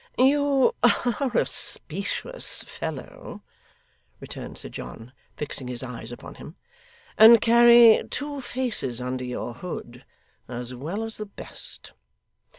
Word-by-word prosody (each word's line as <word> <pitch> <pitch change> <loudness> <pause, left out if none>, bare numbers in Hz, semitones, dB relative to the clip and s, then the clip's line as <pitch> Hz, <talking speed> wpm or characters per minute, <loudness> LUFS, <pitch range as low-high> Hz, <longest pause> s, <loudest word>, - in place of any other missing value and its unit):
'You 275 0 +3
are 245 +3 +2
a - - +3
specious - - -1
fellow,' 155 -5 -8 0.8
returned - - -9
Sir - - -9
John, 115 +3 -9 0.2
fixing 140 -3 -4
his 125 0 -5
eyes 120 -2 -6
upon 120 - -10
him, 160 - -11 0.6
'and 225 +1 +10
carry 235 0 +7
two 285 0 -5
faces 240 - -3
under 125 +1 -4
your 125 -1 -5
hood, 125 -3 -8 0.4
as 125 0 -6
well 165 - -4
as 225 0 -5
the 215 - -6
best. 200 - -10
200 Hz, 120 wpm, -25 LUFS, -, 0.8 s, and